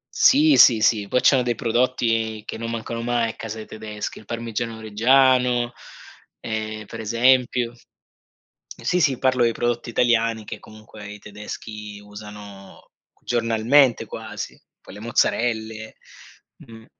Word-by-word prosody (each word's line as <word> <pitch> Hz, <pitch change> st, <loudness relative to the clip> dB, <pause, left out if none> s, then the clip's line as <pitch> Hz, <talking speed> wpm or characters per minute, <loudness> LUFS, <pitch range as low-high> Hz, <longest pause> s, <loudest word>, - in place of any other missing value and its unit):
Sì, 295 Hz, +2 st, +5 dB
sì, 115 Hz, -3 st, +7 dB
sì, 105 Hz, -1 st, +2 dB
poi 125 Hz, -, +1 dB
c'hanno 135 Hz, -3 st, +5 dB
dei 120 Hz, -1 st, -1 dB
prodotti 115 Hz, -2 st, 0 dB
che -, -, -5 dB
non 115 Hz, +1 st, -5 dB
mancano 115 Hz, 0 st, -4 dB
mai 120 Hz, -1 st, 0 dB
a -, -, -9 dB
casa 110 Hz, 0 st, -7 dB
dei 110 Hz, -, -8 dB
tedeschi, 105 Hz, -1 st, -7 dB
il 110 Hz, -, -15 dB
Parmigiano 115 Hz, 0 st, -4 dB
Reggiano 125 Hz, +2 st, +3 dB, 0.7 s
ehm, 110 Hz, -1 st, -5 dB
per 115 Hz, -, -8 dB
esempio 120 Hz, +1 st, +2 dB, 1.1 s
sì, 180 Hz, 0 st, +1 dB
sì, 140 Hz, -6 st, +2 dB
parlo 130 Hz, -2 st, +2 dB
di 115 Hz, -, +2 dB
prodotti 120 Hz, +1 st, -2 dB
italiani 115 Hz, -2 st, +1 dB
che -, -, -7 dB
comunque 110 Hz, -1 st, -13 dB
i 105 Hz, -, -10 dB
tedeschi 105 Hz, 0 st, -9 dB
usano 105 Hz, -1 st, -12 dB, 0.3 s
giornalmente 120 Hz, +2 st, +2 dB
quasi. 110 Hz, 0 st, -7 dB, 0.2 s
Poi -, -, -13 dB
le 105 Hz, -, -10 dB
mozzarelle, 110 Hz, -1 st, -1 dB, 0.7 s
mh. 115 Hz, -1 st, -14 dB
115 Hz, 135 wpm, -22 LUFS, 110-120 Hz, 1.1 s, sì